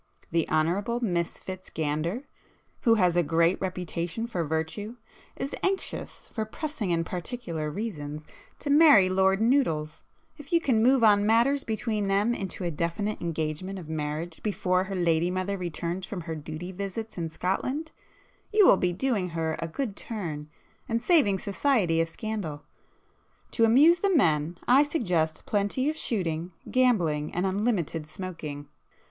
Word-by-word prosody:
The 165 Hz, -1 st, +1 dB
Honourable 185 Hz, +10 st, +1 dB
Miss 175 Hz, -8 st, -1 dB
Fitz 185 Hz, 0 st, -8 dB
Gander 160 Hz, -, -2 dB, 0.6 s
who 230 Hz, -3 st, +5 dB
has 180 Hz, -5 st, +3 dB
a 175 Hz, -, +5 dB
great 170 Hz, +3 st, +2 dB
reputation 180 Hz, +2 st, -3 dB
for 185 Hz, -8 st, -2 dB
virtue, 160 Hz, +8 st, -3 dB, 0.4 s
is 275 Hz, -, -4 dB
anxious, 380 Hz, 0 st, -3 dB
for 220 Hz, -, -3 dB
pressing 220 Hz, -, -4 dB
and 165 Hz, -1 st, +1 dB
particular 170 Hz, -5 st, -4 dB
reasons, 150 Hz, -6 st, -5 dB, 0.3 s
to 285 Hz, -, -3 dB
marry 285 Hz, -, +7 dB
Lord 190 Hz, +1 st, +3 dB
Noodles,—if 235 Hz, -, -1 dB
you 340 Hz, -, +5 dB
can 250 Hz, -9 st, +2 dB
move 255 Hz, +1 st, +4 dB
on 205 Hz, -2 st, +6 dB
matters 235 Hz, +6 st, +3 dB
between 215 Hz, -2 st, -1 dB
them 200 Hz, +4 st, +2 dB
into 190 Hz, -4 st, -4 dB
a 175 Hz, -, -1 dB
definite 170 Hz, +7 st, -2 dB
engagement 165 Hz, +3 st, -3 dB
of 175 Hz, -4 st, -8 dB
marriage 155 Hz, +2 st, -4 dB
before 185 Hz, -3 st, 0 dB
her 195 Hz, 0 st, -5 dB
lady 170 Hz, -1 st, +2 dB
mother 185 Hz, +2 st, -1 dB
returns 175 Hz, 0 st, -4 dB
from 190 Hz, -4 st, -5 dB
her 165 Hz, 0 st, -5 dB
duty 155 Hz, +3 st, -6 dB
visits 200 Hz, +4 st, -5 dB
in 165 Hz, -2 st, -3 dB
Scotland, 255 Hz, -, -2 dB, 0.6 s
you 425 Hz, -2 st, +6 dB
will 195 Hz, -, +7 dB
be 180 Hz, -1 st, +1 dB
doing 205 Hz, -3 st, 0 dB
her 160 Hz, -1 st, -2 dB
a 165 Hz, -, -3 dB
good 210 Hz, +5 st, -3 dB
turn, 160 Hz, -11 st, -5 dB, 0.4 s
and 230 Hz, 0 st, +1 dB
saving 260 Hz, -, +4 dB
society 200 Hz, -, +1 dB
a 165 Hz, -, 0 dB
scandal. 175 Hz, -6 st, -5 dB, 0.9 s
To 230 Hz, -, +3 dB
amuse 295 Hz, +10 st, +6 dB
the 400 Hz, -, +2 dB
men 160 Hz, -, +2 dB
I 255 Hz, +3 st, +7 dB
suggest 180 Hz, -, 0 dB
plenty 210 Hz, +8 st, 0 dB
of -, -, -9 dB
shooting, 175 Hz, -, -2 dB, 0.2 s
gambling, 175 Hz, -, +2 dB
and 180 Hz, +2 st, 0 dB
unlimited 190 Hz, -6 st, -1 dB
smoking. 155 Hz, -4 st, -6 dB
185 Hz, 150 wpm, -27 LUFS, 165-230 Hz, 0.9 s, marry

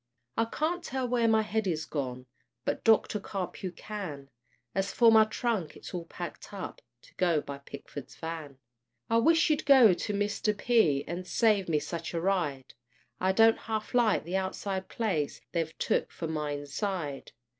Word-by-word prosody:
I 225 Hz, -, +2 dB
can't 320 Hz, +9 st, -1 dB
tell 260 Hz, 0 st, -2 dB
where 240 Hz, -1 st, +2 dB
my 220 Hz, -1 st, +4 dB
head 215 Hz, -1 st, -1 dB
is 160 Hz, -3 st, -1 dB
gone, 130 Hz, -4 st, -4 dB, 0.4 s
But -, -, -1 dB
Doctor 220 Hz, -1 st, +4 dB
Carpue 190 Hz, -2 st, -4 dB
can; 155 Hz, -10 st, -7 dB, 0.4 s
As 195 Hz, +1 st, 0 dB
for 230 Hz, -2 st, +6 dB
my 220 Hz, -1 st, +7 dB
trunk, 215 Hz, -7 st, -2 dB
it's -, -, -10 dB
all 175 Hz, -2 st, -4 dB
packed -, -, -8 dB
up -, -, -7 dB, 0.2 s
To -, -, -19 dB
go 170 Hz, -4 st, +3 dB
by 140 Hz, -1 st, -7 dB
Pickford's 140 Hz, -1 st, -9 dB
van. 160 Hz, -4 st, -6 dB, 0.5 s
I 230 Hz, -, +5 dB
wish 325 Hz, +8 st, +5 dB
you'd 300 Hz, -, +1 dB
go 260 Hz, -8 st, +7 dB
to 210 Hz, -, -3 dB
Mr. 205 Hz, +1 st, 0 dB
P. 205 Hz, -, +3 dB
And 180 Hz, +2 st, -5 dB
save 210 Hz, -6 st, +2 dB
me 155 Hz, -, +3 dB
such 170 Hz, +3 st, -4 dB
a -, -, +1 dB
ride; 165 Hz, -8 st, -1 dB, 0.5 s
I 185 Hz, +1 st, +2 dB
don't 225 Hz, +3 st, +5 dB
half 220 Hz, -1 st, -4 dB
like 235 Hz, -4 st, +3 dB
the 180 Hz, +3 st, -1 dB
outside 190 Hz, 0 st, -3 dB
place, 180 Hz, -11 st, -1 dB
They've 165 Hz, -2 st, -2 dB
took -, -, 0 dB
for 165 Hz, -, -5 dB
my 155 Hz, -2 st, -2 dB
inside. 145 Hz, +1 st, -4 dB
190 Hz, 170 wpm, -29 LUFS, 160-225 Hz, 0.5 s, my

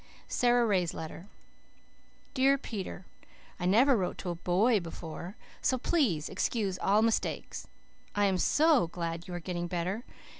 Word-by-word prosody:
SARA 245 Hz, -1 st, +3 dB
RAY'S 185 Hz, -6 st, +1 dB
LETTER 160 Hz, +3 st, -7 dB, 1.1 s
"DEAR 270 Hz, +1 st, +4 dB
PETER: 195 Hz, -7 st, -6 dB, 0.5 s
I 180 Hz, -, -1 dB
never 250 Hz, +8 st, +5 dB
wrote 185 Hz, -5 st, -1 dB
to 180 Hz, -, -4 dB
A -, -, -4 dB
BOY 195 Hz, +7 st, +2 dB
before, 170 Hz, +2 st, -7 dB, 0.3 s
so 260 Hz, -, +2 dB
PLEASE 240 Hz, -, +1 dB
excuse 200 Hz, -6 st, -1 dB
ALL 210 Hz, +3 st, +3 dB
mistakes. 230 Hz, -1 st, -1 dB, 0.5 s
I 205 Hz, 0 st, +3 dB
am 190 Hz, -2 st, +1 dB
SO 300 Hz, -, +4 dB
glad 170 Hz, 0 st, -5 dB
you 180 Hz, -, -5 dB
are -, -, -3 dB
getting 175 Hz, 0 st, -4 dB
better. 180 Hz, +6 st, -2 dB
190 Hz, 145 wpm, -30 LUFS, 175-235 Hz, 1.1 s, never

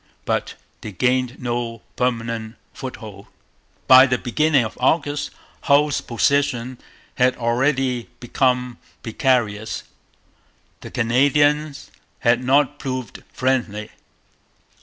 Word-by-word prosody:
But -, -, -2 dB, 0.3 s
they 110 Hz, -, -7 dB
gained 125 Hz, +4 st, 0 dB
no 120 Hz, -2 st, -4 dB
permanent 115 Hz, -2 st, -2 dB, 0.2 s
foothold. 110 Hz, -6 st, -9 dB, 0.6 s
By 130 Hz, 0 st, +8 dB
the 125 Hz, -1 st, +1 dB
beginning 140 Hz, +1 st, +1 dB
of 110 Hz, -, -7 dB
August 145 Hz, +1 st, +1 dB, 0.4 s
Hull's 145 Hz, 0 st, +3 dB
position 130 Hz, 0 st, 0 dB, 0.4 s
had 125 Hz, 0 st, +3 dB
already 125 Hz, +1 st, 0 dB
become 125 Hz, 0 st, 0 dB, 0.2 s
precarious. 110 Hz, -3 st, 0 dB, 1.0 s
The -, -, -10 dB
Canadians 145 Hz, +1 st, +1 dB, 0.3 s
had 120 Hz, +1 st, +2 dB
not 145 Hz, +2 st, +2 dB
proved 130 Hz, -3 st, -5 dB
friendly. 120 Hz, -5 st, -1 dB
125 Hz, 95 wpm, -21 LUFS, 115-135 Hz, 1.0 s, By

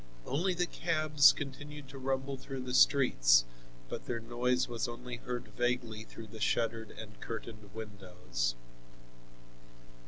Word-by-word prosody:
Only 180 Hz, +7 st, +1 dB
the 180 Hz, +1 st, +2 dB
cabs, 155 Hz, -5 st, +5 dB
continued 145 Hz, +1 st, -7 dB
to 135 Hz, -, -9 dB
rumble 135 Hz, +1 st, -1 dB
through 135 Hz, 0 st, -6 dB
the 125 Hz, 0 st, -4 dB
streets, -, -, +6 dB, 0.4 s
but -, -, -6 dB
their 120 Hz, -1 st, -1 dB
noise 125 Hz, +2 st, +1 dB
was 120 Hz, -1 st, -2 dB
only 120 Hz, +1 st, -6 dB
heard 120 Hz, -1 st, -5 dB
vaguely 115 Hz, -1 st, -1 dB
through 115 Hz, -, -10 dB
the 110 Hz, 0 st, -11 dB
shuttered 115 Hz, 0 st, +1 dB
and 105 Hz, -1 st, -10 dB
curtained 110 Hz, -2 st, -7 dB
windows. 95 Hz, -, -3 dB
120 Hz, 130 wpm, -33 LUFS, 110-135 Hz, 0.4 s, streets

